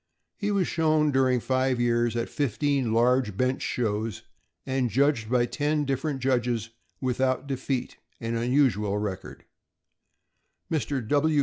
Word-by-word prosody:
He 205 - -2
was 200 -3 +1
shown, 155 -2 +2
during 130 -2 +3
five 130 0 0
years, 120 -1 +1
at 115 - -1
fifteen 140 -2 0
large 120 -2 +2
bench 130 +3 0
shows 110 -1 -2 0.4
and 130 -2 0
judged 135 -3 +1
by 125 -1 +3
ten 150 +4 0
different 135 0 -2
judges 120 -3 0 0.3
without 130 +1 0
defeat 135 -1 -3
— - - -40
an 115 0 -3
unusual 115 -5 +2
record. 100 -3 -5 1.3
Mr. 140 -6 -1
130 Hz, 125 wpm, -26 LUFS, 115-140 Hz, 1.3 s, during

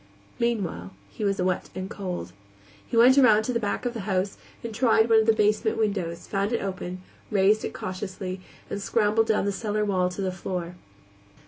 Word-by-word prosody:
Meanwhile, 195 - -2 0.2
he - - -6
was 200 -1 0
wet 180 0 0
and 185 0 -4
cold. 180 - -5 0.5
He 230 - -2
went 255 +4 +7
around 220 -5 +6
to 250 - -2
the 235 - +1
back 210 +3 -2
of 245 - -1
the 230 - -5
house 190 +1 0 0.3
and 230 -1 -5
tried 225 -1 +3
one 225 - +7
of 220 - +2
the - - +7
basement 215 -1 +1
windows, 190 -6 -1
found 200 +2 -1
it 235 - 0
open, 185 -1 -5 0.3
raised 205 +1 +3
it - - -4
cautiously, 185 0 -5 0.3
and 200 - -4
scrambled 215 +1 +2
down 215 -2 +2
the 200 - +1
cellar 210 +1 -1
wall 185 -3 +1
to 180 +2 -6
the 185 - 0
floor. 180 -1 -4
200 Hz, 195 wpm, -26 LUFS, 185-220 Hz, 0.5 s, went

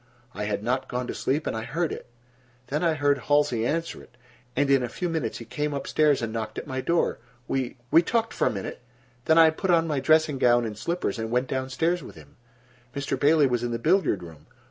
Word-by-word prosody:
I 105 +1 -4
had 105 -1 -2
not 130 +3 -1
gone 125 0 -3
to - - -4
sleep, 145 +4 -1
and - - -2
I 110 - -3
heard 165 +6 -2
it. - - -7 0.6
Then 150 +5 -1
I 165 -2 +2
heard 145 -2 +2
Halsey 125 -4 +2
answer 165 +2 -2
it, 120 - -19 0.4
and 145 +2 +2
in 135 -1 +5
a 125 - -2
few 180 +9 -3
minutes 160 -9 -2
he 115 - -9
came 150 +3 -3
up 140 - -4
stairs 150 -5 +2
and 110 -1 -3
knocked 110 -1 -4
at - - -4
my 130 -2 -3
door. 170 +6 0 0.3
We—we 130 +3 +1
talked 225 +5 -1
for - - +1
a - - +1
minute, 100 +2 -6 0.4
then 160 - +4
I 160 -1 +7
put 190 +4 -4
on 165 -2 +4
my 150 -4 -1
dressing 155 -1 +3
gown 120 -2 +4
and 110 -2 -5
slippers, 170 +2 -2
and 110 0 -3
went 125 +2 0
down 130 0 -2
stairs 170 +6 0
with - - -11
him. 75 -3 -16 0.6
Mr. 140 0 -2
Bailey 150 +1 +4
was 125 -3 0
in 120 - -2
the 120 - -2
billiard 155 - +2
room. 80 -3 -13
135 Hz, 235 wpm, -26 LUFS, 120-160 Hz, 0.6 s, I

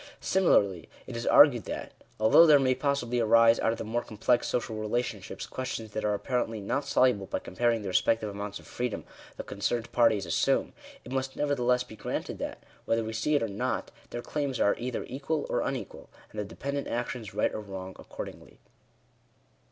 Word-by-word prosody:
Similarly, 100 - +2 0.2
it 125 - -8
is 115 - -4
argued 125 - +7
that, - - -5 0.3
although 110 +10 +7
there 150 -2 +8
may 130 -2 +3
possibly 125 -3 0
arise 115 0 +5
out 115 - +2
of 115 - -3
the - - -4
more 115 +2 -1
complex 120 +2 0
social 120 -2 -2
relationships, 110 -1 -3
questions 125 -4 -5
that 110 - -3
are 105 -1 +1
apparently 115 -1 -2
not 135 +8 -2
soluble 120 -7 +3
by - - -2
comparing 115 +3 0
the - - -4
respective 105 +4 +2
amounts 100 0 -5
of - - -15
freedom 125 -3 -3 0.3
the - - -5
concerned 110 +3 -2
parties 115 -5 +3
assume, 85 - +1 0.3
it 125 - -9
must 130 0 -2
nevertheless 125 -4 +1
be 115 -3 -12
granted - - -4
that, - - -5 0.2
whether 115 0 +1
we 110 0 -5
see 115 +8 +1
it 145 - +2
or - - 0
not, 100 0 -2 0.2
their 120 - -5
claims 140 -4 -2
are 100 - +3
either 125 0 -3
equal 145 +4 -2
or - - +1
unequal, - - -5 0.2
and 105 - -6
the 105 - -2
dependent 140 +6 -4
actions 120 -3 -4
right - - +1
or 110 - -4
wrong 95 -2 -7
accordingly. - - -9
115 Hz, 185 wpm, -29 LUFS, 105-130 Hz, 0.3 s, there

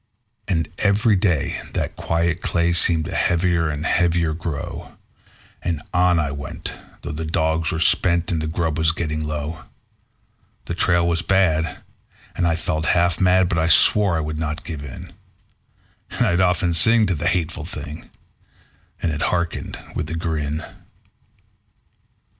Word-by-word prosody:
And 80 -5 0
every 105 +2 +3
day 90 -7 0
that - - -2
quiet 85 +1 -1
clay 85 0 +1
seemed 80 -2 +4
to - - -6
heavy 90 +1 +1
and 80 -2 -1
heavier 85 -1 +2
grow; 80 -2 -6 0.6
And 85 -4 -2
on 90 -1 +3
I 75 -3 0
went, 70 0 -6 0.3
though - - -5
the 75 +2 -4
dogs 80 0 0
were 80 - -2
spent 85 +1 +3
and 80 -2 -1
the 80 - -2
grub 80 -1 -1
was 80 0 +3
getting 75 -2 -3
low; 75 +1 -4 1.0
The - - -4
trail 85 -1 +2
was 85 0 0
bad, 80 -6 +1 0.5
and 85 - +1
I 85 - +2
felt 80 -1 -2
half 85 0 +2
mad, 90 0 +4
but 85 -2 0
I 80 - +1
swore 95 +1 +5
I - - -1
would 75 0 -4
not 75 0 -3
give 75 -4 -6
in; 70 -3 -9 1.0
And - - 0
I'd 85 +1 +2
often 90 -1 +2
sing 110 +6 +5
to 95 - 0
the 85 +1 -2
hateful 85 -3 -1
thing, 75 +3 -8 0.9
and 85 - +1
it 75 0 -4
hearkened 85 -2 -2 0.2
with - - -3
a 85 - -3
grin. 80 -2 -2
85 Hz, 155 wpm, -21 LUFS, 80-90 Hz, 1.0 s, swore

